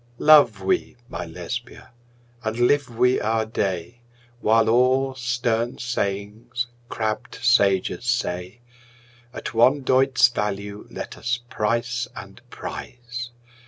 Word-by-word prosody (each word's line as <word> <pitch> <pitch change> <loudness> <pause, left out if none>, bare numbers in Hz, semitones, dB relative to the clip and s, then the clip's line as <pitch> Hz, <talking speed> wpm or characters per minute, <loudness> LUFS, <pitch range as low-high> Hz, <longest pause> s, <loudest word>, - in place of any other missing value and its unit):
Love 145 -10 +6
we 95 - 0
(my - - -5
Lesbia!) 120 +10 -7 0.5
and 110 +1 -2
live 135 +3 +3
we 125 +2 +2
our 110 +1 +1
day, 100 +1 -3 0.4
While 110 0 +3
all 130 +3 +3
stern 120 -1 -1
sayings 115 +1 -3 0.2
crabbed 110 +2 -3
sages 100 -2 +3
say, 115 -3 -2 0.7
At - - -6
one 130 +5 +4
doit's 130 -1 +4
value 105 -2 -4
let - - -7
us 120 0 -1
price 120 +3 -1
and - - -10
prize! 120 0 -7
120 Hz, 110 wpm, -23 LUFS, 105-125 Hz, 0.7 s, Love